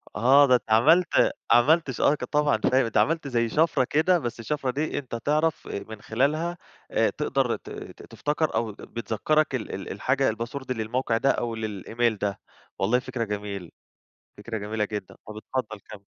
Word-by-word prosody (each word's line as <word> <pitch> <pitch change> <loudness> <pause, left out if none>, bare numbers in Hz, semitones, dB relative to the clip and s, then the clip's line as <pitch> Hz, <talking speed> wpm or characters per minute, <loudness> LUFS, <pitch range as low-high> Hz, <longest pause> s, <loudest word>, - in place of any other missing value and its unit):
آه، 135 +6 +6
ده 130 -2 +5
أنت 120 - 0
عملت 160 +11 +5 0.2
عملت 140 +6 +4
ش 125 - -5
آه 145 - +4
ك - - -8
طبعًا 150 -1 +2
فاهم 130 -3 +2
عملت 160 -2 +2
زي 120 -3 0
شفرة 155 -1 +2
كده، 160 +7 +2
بس 120 -5 -5
الشفرة 135 +2 -2
دي 150 +5 -2
أنت 130 -4 -7
تعرف 150 +7 0
آآ، 100 - -5
من 110 -1 -9
خلالها 155 +11 0 0.3
آآ - - +3
تقدر - - 0
ت-ت - - -10
تفتكر 150 +2 -2
أو 115 -2 0
بتذكرك 120 +8 -1
ال 120 - -4
ال 95 - -7
الحاجة 130 +7 +1
الpassword 120 +4 -6
للموقع 115 0 -1
ده 135 - +2
أو 120 -1 -2
للemail 110 +1 -1
ده. 100 -1 -2 0.4
والله 110 +6 +2
فكرة 125 -2 -4
جميلة، 100 -4 -5 0.7
فكرة 110 +2 -5
جميلة 105 +1 -2
جدًا. 105 -3 -6
طب 105 0 -8
اتفضل 110 -1 -4
كَمّل. 100 -1 -11
120 Hz, 170 wpm, -26 LUFS, 110-145 Hz, 0.7 s, آه